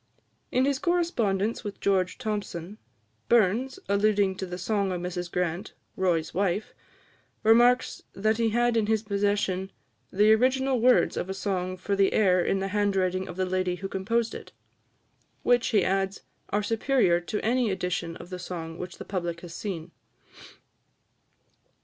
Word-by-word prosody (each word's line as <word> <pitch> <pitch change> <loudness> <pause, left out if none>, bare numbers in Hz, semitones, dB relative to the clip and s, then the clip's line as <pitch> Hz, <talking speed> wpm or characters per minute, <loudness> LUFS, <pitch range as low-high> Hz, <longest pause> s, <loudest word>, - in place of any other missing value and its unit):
In 255 +1 +3
his 275 -1 +1
correspondence 235 - 0
with 205 -2 -6
George 185 -2 +1
Thomson, 210 -4 -4 0.5
Burns, 235 - +3
alluding 200 -1 +2
to 190 - -4
the 180 0 -5
song 200 +1 0
of 180 - -2
Mrs 175 0 -4
Grant, 180 +2 -2 0.2
"Roy's 175 -4 0
Wife," 195 +2 -1 0.7
remarks 240 +3 +4
that 215 +2 +1
he 230 -1 +2
had 240 +1 +2
in 220 -2 +2
his 220 -1 +1
possession 200 -2 0 0.4
"the 210 +3 +5
original 260 +2 +2
words 250 +1 +4
of 180 - -3
a 190 - -3
song 185 -2 -2
for 200 +2 -2
the 195 -1 +3
air 185 -4 +4
in 195 - +1
the 195 0 -2
handwriting 190 -2 0
of 180 - -7
the 185 - +1
lady 185 -1 0
who 195 +2 -5
composed 220 +5 -1
it," - - -9 0.9
which, 245 -1 +3
he 210 -5 +2
adds, 195 +1 0 0.3
"are 205 +1 0
superior 225 -4 +2
to 210 +4 -3
any 240 0 +2
edition 180 -3 -2
of 175 - -12
the 180 - -5
song 165 -2 -6
which 180 0 -7
the - - -8
public 175 -3 -3
has 175 -2 -9
seen." 170 -4 -5
195 Hz, 155 wpm, -27 LUFS, 185-220 Hz, 0.9 s, the